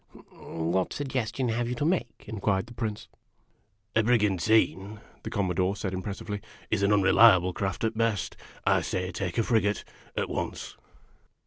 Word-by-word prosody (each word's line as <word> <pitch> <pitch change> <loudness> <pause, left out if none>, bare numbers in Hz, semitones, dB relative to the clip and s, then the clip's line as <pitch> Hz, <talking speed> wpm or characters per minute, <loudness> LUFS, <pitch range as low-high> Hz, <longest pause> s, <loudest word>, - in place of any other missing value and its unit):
" - - -19
What 85 +3 -2
suggestion 130 -2 -2
have 120 +1 -1
you 125 - -2
to 145 - -1
make?" 150 -10 -1
inquired 100 -1 -1
the 120 - -12
Prince. 110 -2 -4 0.4
" 105 0 -42
A 110 - +5
brigantine," 105 -2 +2 0.2
the - - -6
Commodore 95 0 0
said 95 -2 -4
impressively, 100 +2 -4 0.2
" - - -25
is 110 - +1
an 100 - +3
unre 100 -2 +4
liable 95 -6 +6
craft 100 +3 -3
at 110 0 0
best. 115 -3 0 0.3
I - - +4
say, 90 0 -2
take 90 +3 -4
a 115 - +3
frigate, 105 -3 +1 0.3
at - - 0
once." - - -4
105 Hz, 165 wpm, -28 LUFS, 95-115 Hz, 0.4 s, liable